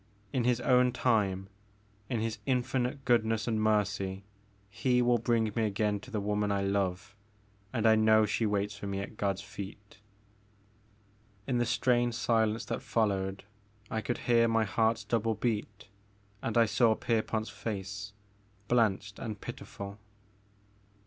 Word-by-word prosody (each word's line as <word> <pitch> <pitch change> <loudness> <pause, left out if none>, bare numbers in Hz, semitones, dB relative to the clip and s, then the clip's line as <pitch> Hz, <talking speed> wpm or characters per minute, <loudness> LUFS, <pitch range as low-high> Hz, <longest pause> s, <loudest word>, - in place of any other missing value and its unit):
In 125 -3 +1
His 125 -1 +2
own 125 0 +4
time, 100 -7 +1 0.6
in 115 -3 -1
His 115 0 -2
infinite 130 +1 0
goodness 115 -2 +2
and 110 -2 0
mercy 100 -2 0 0.5
He 125 +3 +1
will 120 -1 +3
bring 115 -1 +1
me 115 - +1
again 105 0 0
to 105 - -13
the 110 -4 -2
woman 105 0 0
I 100 -1 0
love. 95 0 -1 0.6
And 115 -3 -1
I 110 - +7
know 110 0 +5
she 110 +1 0
waits 100 0 -1
for 100 0 -7
me 100 0 -2
at 100 - -7
God's 100 -2 -1
feet." 100 +1 -9 1.5
In 125 -2 0
the 120 - +1
strained 120 0 +2
silence 110 -1 +1
that - - -3
followed 100 -3 0 0.5
I 110 - -1
could 120 - -2
hear 115 -1 +4
my 115 -1 +2
heart's 110 +2 +1
double 115 -1 0
beat 105 -2 -3 0.5
and 115 0 -1
I 115 - +6
saw 110 +1 +3
Pierpont's 110 -1 -1
face, 100 -1 -5 0.5
blanched 105 -4 +1
and 105 -2 -5
pitiful. 100 +1 -8
110 Hz, 145 wpm, -30 LUFS, 100-115 Hz, 1.5 s, I